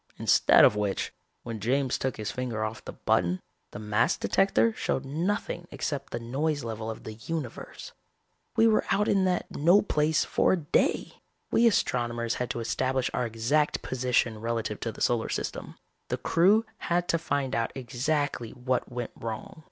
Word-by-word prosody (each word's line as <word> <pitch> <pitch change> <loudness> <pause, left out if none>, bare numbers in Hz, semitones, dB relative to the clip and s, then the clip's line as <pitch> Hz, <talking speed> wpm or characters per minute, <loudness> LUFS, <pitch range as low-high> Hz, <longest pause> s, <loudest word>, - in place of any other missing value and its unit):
Instead - - +6
of - - +4
which, 105 -2 -1 0.3
when 115 -2 -5
James 130 +4 0
took 130 -1 -2
his 105 -2 -3
finger 120 -4 -3
off 110 +1 -6
the - - -5
button, 90 +1 +1 0.3
the - - -9
mass 105 +1 +1
detector 195 +4 +2
showed 135 -9 -2
nothing 175 +4 -2
except 145 -3 -4
the 120 - -3
noise 140 +5 -1
level 110 -1 -4
of 110 - -7
the 110 - -7
universe. 130 +4 -6 0.6
"We 225 - +5
were 220 -1 +4
out 210 +1 +2
in 195 -1 +3
that 180 -1 +1
no 175 +7 +5
place 155 -4 +1
for - - +2
a - - +2
day. 150 -4 0 0.3
We 235 - +5
astronomers 120 - 0
had 125 - -1
to 120 - -3
establish 130 +3 0
our 125 - 0
exact 120 +7 0
position 125 -3 0
relative 115 -2 -2
to 115 - -3
the - - -12
solar 120 -2 +1
system. - - -4 0.3
The - - -2
crew 200 +7 +3 0.2
had 175 0 +1
to 165 - +2
find 140 -4 -1
out 115 0 0
exactly 135 0 -1
what 125 0 -2
went 120 -1 -4
wrong. 115 +6 -6
125 Hz, 170 wpm, -28 LUFS, 115-160 Hz, 0.6 s, Instead